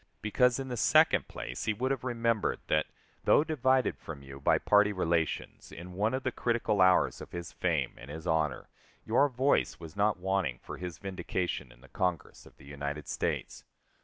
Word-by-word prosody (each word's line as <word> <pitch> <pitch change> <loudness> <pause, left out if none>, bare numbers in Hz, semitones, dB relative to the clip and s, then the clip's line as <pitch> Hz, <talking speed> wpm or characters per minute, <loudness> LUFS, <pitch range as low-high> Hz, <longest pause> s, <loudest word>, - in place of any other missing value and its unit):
Because, 125 +3 +3
in 135 -1 -5
the 125 - -3
second - - +4
place, - - -6
he 110 - +1
would 130 +5 -1
have 135 -3 -2
remembered 115 -3 0
that, 75 - +1 0.4
though - - +5
divided 130 -5 +1
from 70 -4 -8
you 70 0 -10
by - - +4
party 105 0 +4
relations, 85 -4 -1
in 90 +2 -9
one 105 +6 0
of 130 - -3
the 130 - 0
critical 115 -4 0
hours 95 0 +4
of - - -10
his 85 -1 -6
fame - - 0
and 65 - -11
his 80 +3 -7
honor, 80 -5 0 0.4
your 140 +6 +3
voice 130 +2 +1
was 80 +1 -10
not 105 0 +2
wanting 95 -8 -1
for - - -7
his 90 -2 -6
vindication 95 -1 -3
in - - -19
the 70 - -16
Congress 90 +2 -3
of - - -19
the - - -16
United 70 +1 -5
States. - - -3
95 Hz, 190 wpm, -30 LUFS, 80-120 Hz, 0.4 s, though